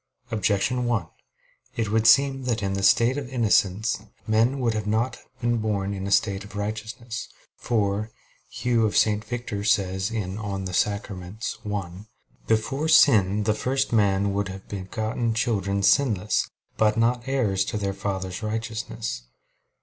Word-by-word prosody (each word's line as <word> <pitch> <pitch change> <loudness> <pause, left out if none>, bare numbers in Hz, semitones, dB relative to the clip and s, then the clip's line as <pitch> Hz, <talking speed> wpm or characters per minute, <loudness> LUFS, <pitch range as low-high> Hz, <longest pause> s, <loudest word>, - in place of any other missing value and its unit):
Objection 110 +3 +1
1: 115 -7 0 0.7
It 110 -3 -1
would 110 0 +3
seem 135 +3 +5
that 115 -4 -1
in 95 0 -1
the 100 - -2
state 120 +7 +4
of 135 -4 -7
innocence 110 -4 +2 0.3
men 115 +5 +2
would 120 -3 +1
not 110 +4 0
have 130 0 -25
been 120 0 +1
born 100 -3 -1
in 95 0 -4
a - - -4
state 100 -1 +2
of 100 0 -12
righteousness. 110 +3 -5 0.3
For 105 -2 -1 0.4
Hugh 120 -3 +1
of 105 - -1
St. 105 -1 +3
Victor 115 -3 -4
says 95 -2 +1
(De 115 - -6
Sacram. 100 0 -3 0.3
i): 100 -4 -3 0.6
"Before 135 +7 0
sin 105 - +5
the 110 +1 +2
first 130 +4 -1
man 100 -2 +2
would 100 0 -1
have 95 0 -9
begotten 110 +4 -2
children 100 -4 0
sinless; 105 -3 +2 0.3
but 110 0 +3
not 120 +2 +1
heirs 110 -8 +1
to 105 - -3
their 100 -1 -2
father's 95 -2 -4
righteousness." 110 - -4
110 Hz, 145 wpm, -25 LUFS, 100-115 Hz, 0.7 s, seem